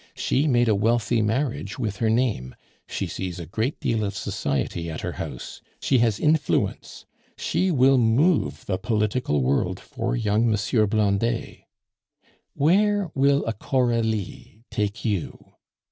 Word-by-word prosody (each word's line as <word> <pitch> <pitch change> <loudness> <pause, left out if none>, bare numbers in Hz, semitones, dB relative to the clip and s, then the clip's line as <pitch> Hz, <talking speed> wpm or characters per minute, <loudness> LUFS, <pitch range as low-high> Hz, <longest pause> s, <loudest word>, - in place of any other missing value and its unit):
She 140 +4 +1
made 120 -3 +3
a 110 - +4
wealthy 115 +3 +1
marriage 110 -1 -1
with 105 -6 -3
her 110 +1 +1
name; 110 - 0 0.3
she - - -3
sees 90 -2 -5
a 85 - -6
great 110 - -2
deal 115 -2 0
of 100 -1 -3
society 85 -1 -2
at 80 - -5
her - - -3
house; - - -7 0.2
she 130 - +2
has 115 -3 +2
influence, 150 -1 0 0.3
she 190 - 0
will 135 -4 +4
move 115 - +2
the 95 -2 -2
political 105 - 0
world 65 +2 0
for - - -3
young 110 0 +1
M. 105 - +2 0.3
Blondet. 110 +2 0 0.9
Where 195 +4 +2
will 140 +1 +3
a 115 - -1
Coralie 115 -3 -1
take 105 +3 -2
you? 100 -7 -1
115 Hz, 140 wpm, -24 LUFS, 100-130 Hz, 0.9 s, a